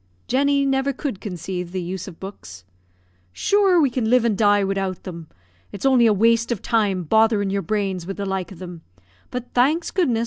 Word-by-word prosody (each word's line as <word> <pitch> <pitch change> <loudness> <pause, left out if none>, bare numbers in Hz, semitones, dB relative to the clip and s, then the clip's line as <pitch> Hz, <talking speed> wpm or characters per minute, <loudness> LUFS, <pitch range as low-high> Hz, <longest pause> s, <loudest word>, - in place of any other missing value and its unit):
Jenny 280 +2 +2
never 270 0 +1
could 260 -6 -5
conceive 180 -2 -5
the 185 - -3
use 180 +1 -5
of 175 -4 -11
books. 95 - -10 0.7
"Sure, 390 - +3
we 280 -5 +3
can 235 -3 -1
live 250 -1 +4
and 225 -3 +2
die 205 0 +3
widout 195 -2 -2
them. 170 -3 -8 0.4
It's 200 - -6
only 255 -3 +5
a - - +5
waste 230 +3 +2
of 230 - -3
time 205 -5 +1
botherin' 215 +2 +2
your 200 0 0
brains 195 -4 -2
wid 195 - -5
the 200 - -3
like 190 -2 -3
of 190 - -10
them; 175 -2 -9 0.5
but, 250 0 -6
thanks 300 +7 +2
goodness! 280 -12 +1
205 Hz, 195 wpm, -22 LUFS, 190-250 Hz, 0.7 s, only